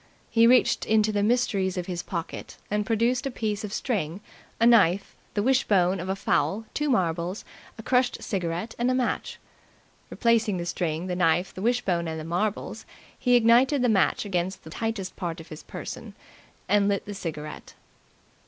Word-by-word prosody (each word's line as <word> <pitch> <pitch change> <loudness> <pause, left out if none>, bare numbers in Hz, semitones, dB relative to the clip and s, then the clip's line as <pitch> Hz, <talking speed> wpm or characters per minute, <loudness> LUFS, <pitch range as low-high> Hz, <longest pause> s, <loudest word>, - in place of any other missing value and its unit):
He 230 0 +5
reached 250 +1 +4
into 215 0 +3
the 205 -1 0
mysteries 205 -4 +1
of 180 - -2
his 175 -2 -3
pocket 170 -3 -6
and 210 0 0
produced 240 +3 +1
a - - -1
piece 215 -4 -3
of 210 - -5
string, 190 - -2 0.4
a 230 - +4
knife, 200 -5 +4 0.2
the 205 - +1
wishbone 200 -8 +3
of 180 +2 -5
a 190 - 0
fowl, 205 +2 0
two 295 0 -1
marbles, 180 -4 0 0.3
a 220 - -8
crushed 250 +1 +1
cigarette, 180 +2 -3
and 240 +1 +2
a 255 - +2
match. 255 -1 -1 0.7
Replacing 230 -4 +2
the 170 - -3
string, 170 -1 -2
the 180 -1 -2
knife, 175 +1 +2
the 185 - -8
wishbone 195 -7 0
and 160 0 -4
the - - -6
marbles, 180 +6 -2 0.4
he 245 0 +3
ignited 245 +4 +4
the 245 - +3
match 205 0 +2
against 185 -1 -2
the 160 - -11
tightest 220 -2 -3
part 170 -2 -4
of 160 - -12
his 155 0 -9
person - - -8 0.5
and 205 -1 +3
lit 200 -1 0
the 205 - -6
cigarette. 155 -5 -7
200 Hz, 175 wpm, -26 LUFS, 175-230 Hz, 0.7 s, He